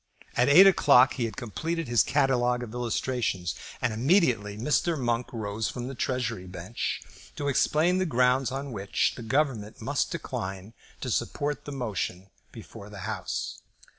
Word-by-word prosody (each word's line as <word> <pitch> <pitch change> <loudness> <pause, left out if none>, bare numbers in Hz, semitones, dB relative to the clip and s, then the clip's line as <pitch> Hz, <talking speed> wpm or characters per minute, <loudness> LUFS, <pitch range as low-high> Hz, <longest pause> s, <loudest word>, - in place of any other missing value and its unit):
At 125 +3 +3
eight 175 +7 +9
o'clock 140 -9 +6
he 120 - -1
had 115 - -6
completed 160 - -3
his 120 -1 +4
catalogue 125 -4 +2
of 115 -2 -8
illustrations, 120 -6 -1 0.3
and 115 - +1
immediately 120 - +2
Mr. 150 +7 +1
Monk 120 -1 0
rose 110 -2 -3
from 125 -1 -5
the 135 - -5
Treasury 120 -7 -2
bench 90 +5 -4 0.3
to 145 - -3
explain 155 +6 +2
the 185 - +1
grounds 125 -1 +2
on 135 +1 -4
which 100 -3 0
the - - -9
Government 115 -4 -1
must - - -1
decline 95 +3 -5 0.3
to - - -3
support 145 0 -2
the 145 - -6
motion 100 -7 -4 0.2
before - - -11
the - - -9
House. - - -4
125 Hz, 155 wpm, -27 LUFS, 110-140 Hz, 0.3 s, eight